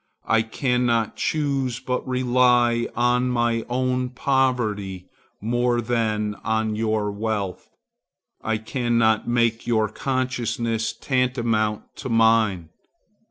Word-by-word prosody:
I 115 -1 +3
cannot 120 -1 0
choose 135 -5 -1
but 125 0 -3
rely 125 -2 +3
on 125 +1 +2
my 120 -2 +1
own 125 0 0
poverty 120 -8 0 0.3
more 120 +2 +1
than 110 -3 -1
on 110 -1 0
your 110 -1 0
wealth. 100 -2 -3 0.7
I 110 0 0
cannot 115 -1 +1
make 115 -1 +1
your 110 -3 +2
consciousness 120 -3 -2
tantamount 120 -5 0
to 130 - -6
mine. 110 -7 +3
115 Hz, 100 wpm, -23 LUFS, 110-125 Hz, 0.7 s, I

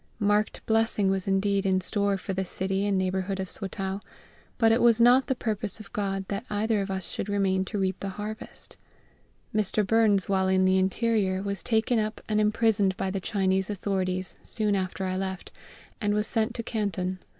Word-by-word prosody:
Marked 210 0 +1
blessing 220 -3 +2
was 190 -1 -2
indeed 195 0 +2
in 190 -1 +2
store 200 +1 +1
for 195 +1 -4
the 190 0 -1
city 190 +2 -1
and 200 -1 +1
neighbourhood 190 +1 -1
of 190 -1 -3
Swatow; 195 0 -4 0.6
but 225 -2 +4
it 230 - +3
was 235 -1 +5
not 245 +3 +6
the 265 - +1
purpose 215 -3 -3
of 215 - -12
GOD 195 -2 -2
that 200 +2 -2
either 215 0 +1
of 195 - -4
us 190 -2 -3
should 205 - -4
remain 195 -2 +1
to 210 - -4
reap 190 -1 -1
the 195 - -4
harvest. 210 +4 -8 0.8
Mr. 215 0 +1
Burns 210 -3 +3
while 190 -1 +2
in 190 0 +3
the 190 0 +4
interior 190 -1 +1
was 200 -2 -3
taken 225 +1 +1
up 215 0 -2
and 215 0 +2
imprisoned 210 -3 +2
by 190 - -1
the 195 - -2
Chinese 190 0 0
authorities 185 -2 -2
soon 210 -3 0
after 190 0 -2
I 185 0 -1
left, 190 -1 -4 0.5
and 205 -1 +1
was 210 0 +1
sent 225 +1 -1
to 230 - -3
Canton. 190 -5 -2
200 Hz, 190 wpm, -27 LUFS, 190-215 Hz, 0.8 s, not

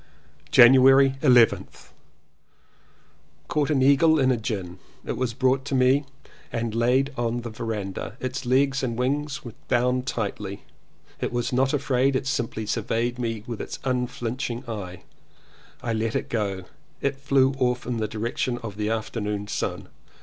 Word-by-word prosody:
January 135 0 +7
11th. 125 -5 +3 1.6
Caught 150 -1 0
an 135 -4 +2
eagle 150 +4 +5
in 130 -3 +3
a - - +3
gin. 95 -6 -4 0.3
It - - -3
was 125 -3 -2
brought 130 +1 +2
to 140 -1 -2
me 130 +3 +3 0.5
and 115 -1 -2
laid 125 +5 +2
on 120 0 -1
the 120 -1 -6
verandah. 110 -2 -5
Its 130 +2 -4
legs 135 +2 +2
and 120 -3 -2
wings 145 +3 -2
were 120 - -7
bound 125 +1 +1
tightly. 100 -4 -4 0.6
It - - -2
was 120 0 -2
not 130 +1 +2
afraid, 135 -2 +1
it 130 - -1
simply 115 -4 -2
surveyed 115 +3 -1
me 115 -3 -3
with 120 -3 -5
its - - -6
un 125 -1 0
flinching 125 0 -4
eye. 95 -5 -6 0.8
I 115 -2 -1
let 110 0 -1
it - - -2
go 105 -3 0
and 95 -1 -8 0.4
it 140 0 -1
flew 135 -1 +2
off 125 -1 0
in 120 -1 -2
the 110 -1 -1
direction 115 +3 -2
of 105 -3 -6
the 105 0 -1
afternoon 105 -2 -3
sun. - - -3
125 Hz, 155 wpm, -25 LUFS, 115-135 Hz, 1.6 s, January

